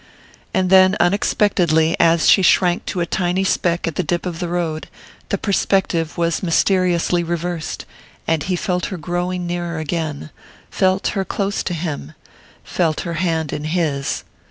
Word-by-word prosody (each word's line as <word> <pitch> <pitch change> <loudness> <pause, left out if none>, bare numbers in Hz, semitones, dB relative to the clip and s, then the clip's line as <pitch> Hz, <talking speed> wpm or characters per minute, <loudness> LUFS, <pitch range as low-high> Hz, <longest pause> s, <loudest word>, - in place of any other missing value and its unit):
And 185 -1 0
then, 190 0 +6
unexpectedly, 175 -3 +2
as 165 -1 +4
she 195 - +6
shrank 180 -1 +3
to 180 - -2
a - - +1
tiny 180 +2 0
speck 175 -2 0
at 165 - -2
the 185 - +1
dip 175 +3 -2
of 170 -2 -4
the 175 - -2
road, 170 -2 -2 0.4
the - - 0
perspective 190 -5 0
was 170 -1 0
mysteriously 175 -1 +2
reversed, 170 -1 -4 0.4
and 160 -2 +1
he 185 +4 -1
felt 180 0 -1
her 190 - -5
growing 175 +2 -3
nearer 175 -1 -3
again, 155 -2 -3 0.4
felt 190 0 +1
her 195 - -1
close 200 +1 -2
to 175 - -3
him 155 - -5 0.5
felt 160 -3 0
her 170 - -4
hand 160 -4 -1
in 150 - -4
his. 155 -4 -1
175 Hz, 155 wpm, -20 LUFS, 165-185 Hz, 0.5 s, then